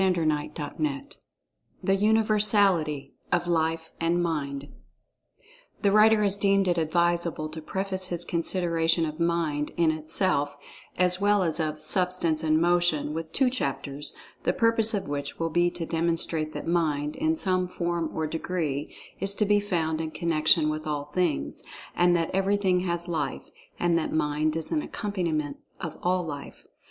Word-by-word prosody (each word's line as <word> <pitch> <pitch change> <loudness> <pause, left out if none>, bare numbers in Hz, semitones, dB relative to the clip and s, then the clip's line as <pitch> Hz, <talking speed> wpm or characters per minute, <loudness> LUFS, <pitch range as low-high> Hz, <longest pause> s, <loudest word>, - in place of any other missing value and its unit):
"[Pg 190 -1 +3
30] 155 -3 0
CHAPTER 150 - -4
III 280 -2 -1 0.8
THE 195 - +2
UNIVERSALITY 205 -7 +2 0.2
OF 175 -1 +2
LIFE 160 -1 0
AND 170 +1 +2
MIND 140 -4 -3 1.1
THE 200 - +4
writer 215 +1 +5
has 200 -1 +2
deemed 195 -1 +2
it 175 -1 +2
advisable 170 -1 +1
to 160 +1 -7
preface 190 +2 0
his 175 -1 -2
consideration 165 -1 +1
of 155 +1 -6
"Mind" 165 -3 0
in 165 -2 +4
itself, 155 -2 0 0.4
as 180 +1 +3
well 205 -1 +3
as 165 -1 0
of 155 -1 -2
Substance 170 -1 +1
and 155 -1 +2
Motion, 175 -3 +2
with 160 0 -5
two 260 -2 +2
chapters, 140 - -2 0.3
the - - +1
purpose 230 -1 +3
of 200 - -3
which 140 -1 -4
will 165 0 -2
be 175 +1 +3
to 175 -1 -4
demonstrate 165 -1 0
that - - -5
Mind, 150 -4 0
in 315 +3 +1
some 185 - +1
form 170 -2 -2
or 160 - -2
degree, 155 -3 -3 0.2
is 195 +1 +1
to 210 - +1
be 205 0 +4
found 165 -6 -1
in 160 - -3
connection 155 -1 +2
with 155 0 -4
all 145 -1 -3
Things—and 175 - 0
that 165 -1 -1
Everything 195 -1 +2
has 175 -1 -2
Life—and 170 +1 -2
that 160 - -3
Mind 155 0 0
is 165 - -3
an 310 - +1
accompaniment 170 - -3 0.2
of 165 -4 -6
all 180 0 +1
Life. 145 -3 -8
170 Hz, 155 wpm, -27 LUFS, 155-185 Hz, 1.1 s, writer